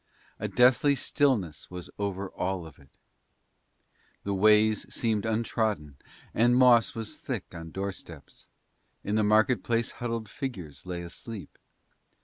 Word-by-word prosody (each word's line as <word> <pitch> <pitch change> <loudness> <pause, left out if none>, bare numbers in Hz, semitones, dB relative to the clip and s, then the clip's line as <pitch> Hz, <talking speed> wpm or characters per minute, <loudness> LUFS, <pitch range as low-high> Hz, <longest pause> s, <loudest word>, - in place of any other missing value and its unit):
A - - -2
deathly 130 +3 +4
stillness 125 - 0
was 90 -1 -7
over 100 -1 -3
all 90 -2 -2
of 80 -2 -13
it. 70 - -22 1.3
The 100 - -2
ways 105 +2 +4
seemed 110 -3 0
untrodden, 110 - -1 0.4
and 120 +2 +4
moss 125 -3 +5
was 110 -2 -5
thick - - -5
on 80 -1 -8
doorsteps; 95 -4 -7 0.6
in 105 - -2
the 110 0 +3
market 110 +4 +3
place 115 0 0
huddled 115 -2 -4
figures 90 - -7
lay 90 -1 -4
asleep. 100 +4 -8
105 Hz, 130 wpm, -28 LUFS, 90-115 Hz, 1.3 s, moss